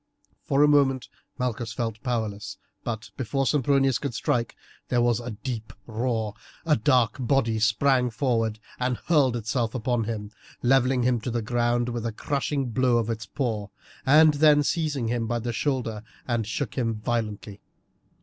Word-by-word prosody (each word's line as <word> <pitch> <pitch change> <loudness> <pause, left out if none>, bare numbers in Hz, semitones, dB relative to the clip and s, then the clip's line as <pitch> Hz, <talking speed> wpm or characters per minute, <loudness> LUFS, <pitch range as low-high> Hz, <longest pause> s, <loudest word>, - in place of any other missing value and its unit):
For 140 +1 +3
a - - +6
moment 135 -3 +3 0.3
Malchus 120 -3 -2
felt 115 -1 -3
powerless, 110 -5 -3 0.3
but 110 -1 -5
before 135 +2 -1
Sempronius 135 -2 +2
could 140 -5 -4
strike 120 -1 -1 0.3
there 125 - +1
was 120 -1 +2
a 120 0 -6
deep 110 0 -5
roar, 110 -2 -2 0.3
a 155 -2 +4
dark 120 -2 +2
body 120 -3 +1
sprang 125 +3 +3
forward 115 -2 0 0.2
and 125 -1 0
hurled 140 -7 +2
itself 115 +1 -1
upon 120 -1 0
him, 105 -2 -4 0.3
levelling 130 0 +3
him 120 -2 +2
to 125 - -3
the 120 -1 -2
ground 120 +1 +1
with 120 -1 -3
a - - -2
crushing 140 +2 -2
blow 125 0 +3
of 115 0 0
its 110 -2 -5
paw, 110 -4 -2 0.4
and 155 +3 +6
then 145 0 +5
seized 155 -1 0
him 115 -2 -1
by 120 +1 0
the 120 0 -3
shoulder 115 -4 -1 0.3
and 115 -3 -1
shook 115 -1 -3
him 115 -2 0
violently. 105 -2 -3
120 Hz, 160 wpm, -26 LUFS, 110-135 Hz, 0.4 s, a